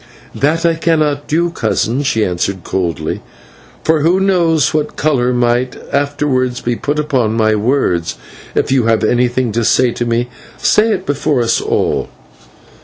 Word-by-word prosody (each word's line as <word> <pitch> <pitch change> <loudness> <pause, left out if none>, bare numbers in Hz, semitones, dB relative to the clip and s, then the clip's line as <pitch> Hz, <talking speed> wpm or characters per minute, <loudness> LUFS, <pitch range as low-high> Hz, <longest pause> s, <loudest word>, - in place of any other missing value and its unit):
"That 160 +4 0
I 170 - +4
cannot 155 -3 0
do, 170 +2 +1
cousin," 115 -2 -1
she 115 -6 +1
answered 90 +1 -2
coldly, 85 -5 -2 0.6
"for 160 -1 +2
who 170 +5 +3
knows 170 -6 +2
what 150 -1 -1
colour 130 -5 +1
might 125 +1 +1 0.2
afterwards 140 -3 0
be 120 0 -2
put 145 +5 -2
upon 135 -8 0
my 110 -1 +2
words. 105 -7 0 0.4
If - - 0
you 130 -4 +2
have 115 -1 +2
anything 120 +1 +1
to 115 +2 -1
say 125 +2 +3
to 120 - -3
me, 120 +1 0 0.3
say 220 +1 +3
it 190 -3 -2
before 145 -1 0
us 115 0 +1
all." - - -1
130 Hz, 155 wpm, -15 LUFS, 115-155 Hz, 0.6 s, I